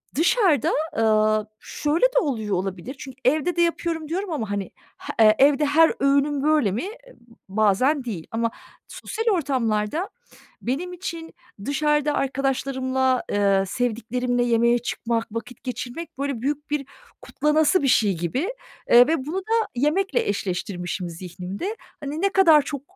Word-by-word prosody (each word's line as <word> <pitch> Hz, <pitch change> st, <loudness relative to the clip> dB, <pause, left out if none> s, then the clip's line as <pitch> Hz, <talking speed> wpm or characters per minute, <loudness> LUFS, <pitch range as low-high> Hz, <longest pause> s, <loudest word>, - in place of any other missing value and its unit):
dışarıda, 335 Hz, -, +3 dB, 0.3 s
ııı, 215 Hz, -1 st, +2 dB
şöyle 305 Hz, +9 st, 0 dB
de -, -, +3 dB
oluyor 220 Hz, -, -1 dB
olabilir, 190 Hz, +7 st, -4 dB
çünkü 265 Hz, -1 st, -9 dB
evde 310 Hz, +7 st, +2 dB
de 345 Hz, -, +2 dB
yapıyorum 335 Hz, -2 st, -1 dB
diyorum 375 Hz, +2 st, -3 dB
ama 225 Hz, -9 st, -3 dB
hani 200 Hz, -2 st, -3 dB, 0.3 s
h 215 Hz, -1 st, +3 dB
evde 290 Hz, +2 st, +5 dB
her 320 Hz, +3 st, +4 dB
öğünüm 280 Hz, +1 st, +2 dB
böyle 300 Hz, -10 st, +3 dB
mi? 240 Hz, -, -3 dB, 0.6 s
Bazen 220 Hz, +8 st, +2 dB
değil. 190 Hz, -10 st, -6 dB
Ama 230 Hz, 0 st, -1 dB, 0.4 s
sosyal 450 Hz, 0 st, -5 dB
ortamlarda 260 Hz, -, -1 dB, 0.5 s
benim 325 Hz, +9 st, -3 dB
için 335 Hz, -2 st, -6 dB, 0.3 s
dışarıda 295 Hz, +1 st, +1 dB
arkadaşlarımla, 265 Hz, -1 st, 0 dB
ııı, 200 Hz, -1 st, +2 dB
sevdiklerimle 245 Hz, +2 st, -1 dB
yemeğe 235 Hz, 0 st, +3 dB
çıkmak, 230 Hz, -1 st, -2 dB
vakit 230 Hz, +2 st, -7 dB
geçirmek, 255 Hz, +5 st, -6 dB
böyle, 275 Hz, -4 st, -3 dB
büyük 295 Hz, +3 st, -3 dB
bir 290 Hz, -2 st, -1 dB, 0.4 s
kutlanası 310 Hz, +3 st, +2 dB
bir -, -, +2 dB
şey 205 Hz, -8 st, +3 dB
gibi. 255 Hz, -, -2 dB, 0.4 s
Eee, 245 Hz, +2 st, +8 dB
ve 315 Hz, -5 st, 0 dB
bunu 325 Hz, +6 st, -3 dB
da 450 Hz, +4 st, 0 dB
yemekle 380 Hz, -, +1 dB
eşleştirmişim 180 Hz, -2 st, -3 dB
zihnimde. 180 Hz, -, -6 dB, 0.3 s
Hani 290 Hz, +4 st, -4 dB
ne 395 Hz, -, +3 dB
kadar 335 Hz, -6 st, +6 dB
çok 280 Hz, -1 st, -5 dB
265 Hz, 135 wpm, -23 LUFS, 220-310 Hz, 0.6 s, Eee